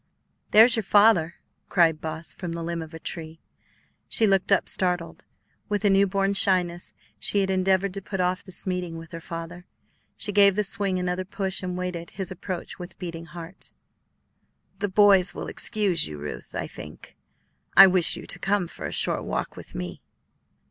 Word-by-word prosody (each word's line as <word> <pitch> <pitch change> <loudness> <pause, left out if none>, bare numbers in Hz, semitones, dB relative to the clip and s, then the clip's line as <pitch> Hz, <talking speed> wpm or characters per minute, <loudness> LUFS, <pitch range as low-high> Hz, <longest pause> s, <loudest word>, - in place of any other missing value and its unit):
"There's 225 +3 +7
your - - +1
father," 200 -5 +4 0.3
cried 165 -4 +3
Boss, 160 +1 -5
from 175 -3 -6
the 170 0 -5
limb 170 0 -3
of 160 0 -9
a - - -5
tree. 160 -1 -6 0.7
She 225 - +3
looked 195 -1 +2
up, 195 - +3
startled. 180 -2 -1 0.5
With 210 0 -1
a 200 - +5
newborn 195 0 +2
shyness 180 -3 +2 0.3
she 200 - +2
had 190 0 0
endeavored 190 0 +1
to 195 - -5
put 195 0 -5
off 180 +1 0
this 185 - -3
meeting 180 -3 -3
with 165 0 -11
her 165 -1 -7
father. 170 +1 -8 0.5
She 205 - -3
gave 200 -1 +5
the 210 - +1
swing 195 -1 -1
another 180 0 -2
push 190 0 -3
and 180 -1 -4
waited 180 -2 -4
his 190 -2 -5
approach 185 0 -6
with 175 0 -9
beating 170 -2 -7
heart. 170 +2 -9 1.1
"The 205 0 -1
boys 195 -1 +5
will - - -5
excuse 200 -8 -1
you, 75 - -8
Ruth, 75 0 -8
I - - -2
think; - - -11 0.6
I 195 - +12
wish 185 -3 +3
you - - -9
to 180 - -5
come 195 -2 0
for - - -7
a - - -7
short - - +1
walk - - -3
with - - -12
me." - - -6
185 Hz, 180 wpm, -25 LUFS, 170-195 Hz, 1.1 s, I